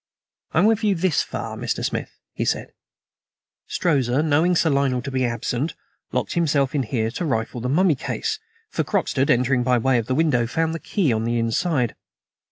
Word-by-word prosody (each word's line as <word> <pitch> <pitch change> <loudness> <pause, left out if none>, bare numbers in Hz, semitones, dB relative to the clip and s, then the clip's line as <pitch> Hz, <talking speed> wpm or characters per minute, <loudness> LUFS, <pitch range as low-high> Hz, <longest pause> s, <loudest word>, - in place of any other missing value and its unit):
"I'm 180 - +4
with 220 0 +3
you 205 -2 +3
this 180 -1 +2
far, - - -5
Mr. - - -2
Smith," - - -4 0.2
he - - -2
said. - - -1 1.0
"Strozza, 140 -5 +1
knowing 160 +4 +3
Sir 165 -2 +3
Lionel 135 -3 +1
to 135 - -5
be 130 -1 0
absent, 120 +5 -2 0.4
locked - - -1
himself 145 -5 +1
in 145 - +1
here 115 -2 -1
to 175 - -4
rifle 120 -5 -2
the 125 - -2
mummy 175 +4 +4
case, 430 - -3 0.3
for - - 0
Croxted, 135 0 0
entering 125 +1 +3
by 125 0 +3
way 125 +1 +2
of 115 - -4
the 130 - 0
window, 135 -7 +2
found 160 +6 0
the 165 - -4
key 165 - 0
on 110 0 -1
the 120 +1 0
inside. 120 - 0
135 Hz, 185 wpm, -23 LUFS, 120-165 Hz, 1.0 s, I'm